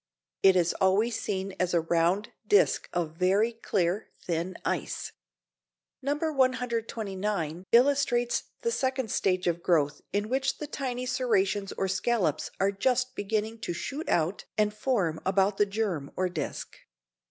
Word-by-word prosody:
It 190 Hz, -1 st, +6 dB
is 175 Hz, -2 st, +3 dB
always 205 Hz, +5 st, +2 dB
seen 195 Hz, 0 st, -3 dB
as 180 Hz, -1 st, +1 dB
a 170 Hz, -, +4 dB
round 170 Hz, +6 st, +1 dB, 0.2 s
disc 205 Hz, -, +3 dB
of 165 Hz, -2 st, -2 dB
very 200 Hz, +6 st, +3 dB
clear, 195 Hz, -3 st, -1 dB
thin 170 Hz, +1 st, -3 dB
ice. -, -, -2 dB, 0.9 s
No. 280 Hz, +2 st, 0 dB
129 225 Hz, -, -1 dB
illustrates 245 Hz, -1 st, +3 dB, 0.2 s
the 465 Hz, -, +1 dB
second 260 Hz, -, -1 dB
stage 185 Hz, -1 st, +1 dB
of 170 Hz, -1 st, 0 dB
growth 150 Hz, -5 st, +2 dB
in 205 Hz, +2 st, 0 dB
which 265 Hz, +3 st, 0 dB
the 300 Hz, -, -5 dB
tiny 255 Hz, -4 st, -3 dB
serrations 205 Hz, -6 st, +1 dB
or 195 Hz, -, -1 dB
scallops 190 Hz, -3 st, 0 dB
are 195 Hz, +1 st, +3 dB
just 250 Hz, +5 st, +1 dB
beginning 215 Hz, +2 st, -2 dB
to 195 Hz, -, -3 dB
shoot 275 Hz, -, -5 dB
out 170 Hz, +3 st, +1 dB
and 210 Hz, -1 st, +2 dB
form 210 Hz, -8 st, 0 dB
about 195 Hz, +1 st, +2 dB
the 205 Hz, -, +3 dB
germ 195 Hz, -9 st, -2 dB
or 185 Hz, 0 st, 0 dB
disc. 180 Hz, -, -5 dB
205 Hz, 140 wpm, -28 LUFS, 180-240 Hz, 0.9 s, It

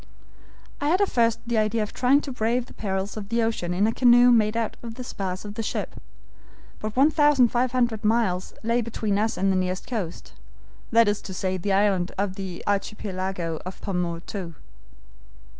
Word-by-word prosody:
"I 290 Hz, -, 0 dB
had 350 Hz, +5 st, +3 dB
at 405 Hz, -, +2 dB
first 230 Hz, -2 st, +2 dB
the 235 Hz, -2 st, +1 dB
idea 215 Hz, +1 st, +1 dB
of 210 Hz, -, -7 dB
trying 265 Hz, +3 st, +3 dB
to 280 Hz, -, -6 dB
brave 240 Hz, 0 st, 0 dB
the -, -, -15 dB
perils 195 Hz, 0 st, -3 dB
of 200 Hz, -2 st, -6 dB
the 230 Hz, 0 st, +1 dB
ocean 225 Hz, -6 st, -1 dB
in 185 Hz, +4 st, +2 dB
a 220 Hz, -, +2 dB
canoe 245 Hz, 0 st, +6 dB
made 220 Hz, -1 st, +3 dB
out 230 Hz, -2 st, -1 dB
of 230 Hz, -1 st, -7 dB
the 255 Hz, -, -6 dB
spars 190 Hz, -5 st, -5 dB
of 205 Hz, -, -6 dB
the 225 Hz, -, -4 dB
ship, 220 Hz, -, -4 dB, 0.8 s
but 215 Hz, 0 st, -5 dB
1,500 255 Hz, -5 st, +3 dB
miles 210 Hz, -5 st, +1 dB
lay 230 Hz, +2 st, +1 dB
between 215 Hz, -3 st, -1 dB
us 220 Hz, +1 st, 0 dB
and 195 Hz, 0 st, +2 dB
the -, -, +1 dB
nearest 185 Hz, 0 st, -1 dB
coast, 200 Hz, -9 st, -5 dB, 0.6 s
that 230 Hz, -1 st, +5 dB
is 205 Hz, 0 st, 0 dB
to 190 Hz, -, -7 dB
say 185 Hz, +1 st, -1 dB
the 195 Hz, +2 st, -1 dB
islands 195 Hz, -3 st, +2 dB
of 195 Hz, -1 st, -1 dB
the 190 Hz, -3 st, -6 dB
Archipelago 190 Hz, -5 st, -2 dB
of 185 Hz, +1 st, -8 dB
Pomotou. 175 Hz, -1 st, -4 dB
215 Hz, 180 wpm, -25 LUFS, 190-235 Hz, 0.8 s, canoe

